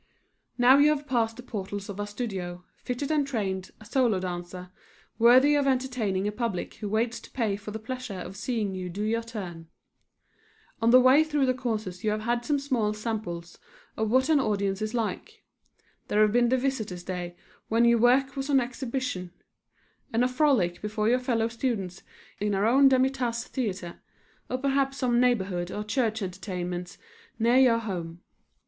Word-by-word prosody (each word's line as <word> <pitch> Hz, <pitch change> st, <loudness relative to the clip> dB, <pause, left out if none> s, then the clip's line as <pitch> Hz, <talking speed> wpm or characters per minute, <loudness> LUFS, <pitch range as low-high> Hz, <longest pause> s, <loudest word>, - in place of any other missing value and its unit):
Now 255 Hz, +3 st, +6 dB
you 295 Hz, +1 st, +6 dB
have 295 Hz, -1 st, 0 dB
passed 230 Hz, -4 st, 0 dB
the 250 Hz, -, -9 dB
portals 200 Hz, -3 st, -5 dB
of 200 Hz, 0 st, -7 dB
our 205 Hz, -, -2 dB
studio, 190 Hz, -5 st, -5 dB, 0.2 s
fitted 260 Hz, +4 st, -3 dB
and 295 Hz, -3 st, +1 dB
trained, 195 Hz, -7 st, -2 dB
a 215 Hz, -, -14 dB
solo 230 Hz, -3 st, +2 dB
dancer, 180 Hz, 0 st, -6 dB, 0.5 s
worthy 255 Hz, +5 st, +6 dB
of 285 Hz, -1 st, +2 dB
entertaining 250 Hz, -7 st, 0 dB
a -, -, 0 dB
public 215 Hz, -4 st, -3 dB
who 210 Hz, -, -5 dB
waits 225 Hz, +2 st, 0 dB
to -, -, -14 dB
pay 225 Hz, -6 st, -1 dB
for 205 Hz, +1 st, -8 dB
the 215 Hz, -, -4 dB
pleasure 250 Hz, -1 st, -6 dB
of 180 Hz, +1 st, -7 dB
seeing 215 Hz, -2 st, -2 dB
you 185 Hz, -1 st, -5 dB
do 200 Hz, +4 st, -4 dB
your 225 Hz, +2 st, 0 dB
turn. 185 Hz, -8 st, -7 dB, 1.1 s
On 225 Hz, -, +3 dB
the 250 Hz, +2 st, +8 dB
way 260 Hz, +4 st, +6 dB
through 295 Hz, -3 st, +1 dB
the 255 Hz, -, +2 dB
courses 215 Hz, -8 st, -4 dB
you 215 Hz, -, +1 dB
have 215 Hz, 0 st, -1 dB
had 240 Hz, +1 st, 0 dB
some 290 Hz, +3 st, +1 dB
small 245 Hz, -7 st, 0 dB
samples 210 Hz, -6 st, -5 dB, 0.4 s
of 220 Hz, -1 st, -1 dB
what 260 Hz, +3 st, +3 dB
an 315 Hz, -2 st, +4 dB
audience 200 Hz, -4 st, 0 dB
is 215 Hz, +2 st, -2 dB
like. 225 Hz, -3 st, -4 dB, 0.6 s
There 210 Hz, +1 st, +3 dB
have 210 Hz, -, +3 dB
been 240 Hz, +1 st, +3 dB
the 260 Hz, -, +3 dB
visitors' 225 Hz, -9 st, -2 dB
days 175 Hz, -1 st, -5 dB, 0.4 s
when 230 Hz, +2 st, +3 dB
your 235 Hz, 0 st, +5 dB
work 265 Hz, +3 st, +3 dB
was 270 Hz, +1 st, -4 dB
on 275 Hz, -2 st, +5 dB
exhibition, 245 Hz, -7 st, -3 dB, 0.8 s
and 230 Hz, +2 st, +2 dB
a -, -, +4 dB
Frolic 250 Hz, -, +2 dB
before 215 Hz, +1 st, -1 dB
your 250 Hz, +1 st, +3 dB
fellow 235 Hz, -3 st, 0 dB
students 230 Hz, -6 st, -3 dB, 0.4 s
in 205 Hz, -1 st, 0 dB
our 195 Hz, +2 st, +1 dB
own 270 Hz, +4 st, +6 dB
Demi 260 Hz, 0 st, +3 dB
Tasse 240 Hz, -3 st, -2 dB
Theatre, 190 Hz, -9 st, -4 dB, 0.5 s
or 255 Hz, -, -1 dB
perhaps 275 Hz, 0 st, 0 dB
some 245 Hz, -3 st, +2 dB
neighborhood 195 Hz, -8 st, +1 dB
or 210 Hz, -, -4 dB
church 220 Hz, 0 st, -1 dB
entertainments 180 Hz, -1 st, -5 dB, 0.4 s
near 235 Hz, +2 st, +3 dB
your 255 Hz, -3 st, +5 dB
home. 175 Hz, -6 st, -5 dB
225 Hz, 180 wpm, -27 LUFS, 195-255 Hz, 1.1 s, the